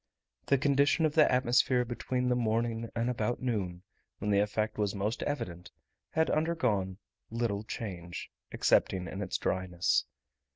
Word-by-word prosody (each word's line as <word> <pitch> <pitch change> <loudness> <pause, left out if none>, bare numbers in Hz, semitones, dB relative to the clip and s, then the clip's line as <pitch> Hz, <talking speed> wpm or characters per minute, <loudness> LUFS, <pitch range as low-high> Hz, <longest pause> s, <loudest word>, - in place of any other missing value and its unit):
The 140 - +4
condition 140 +3 +3
of 155 - +1
the 155 -1 +5
atmosphere 125 0 +3
between 125 +1 -2
the 125 - +3
morning 115 0 0
and 115 0 0
about 120 -1 -1
noon, 95 -8 -2 0.3
when 105 +1 -1
the 100 - +4
effect 105 +1 -1
was 105 -1 0
most 105 +4 -2
evident, 90 -12 -4 0.4
had 160 0 +1
undergone 125 - 0 0.3
little 115 -3 -1
change, 90 -6 -6 0.2
excepting 90 -2 +2
in 95 +4 -5
its 95 - -2
dryness. 95 -1 +1
115 Hz, 140 wpm, -31 LUFS, 100-125 Hz, 0.4 s, the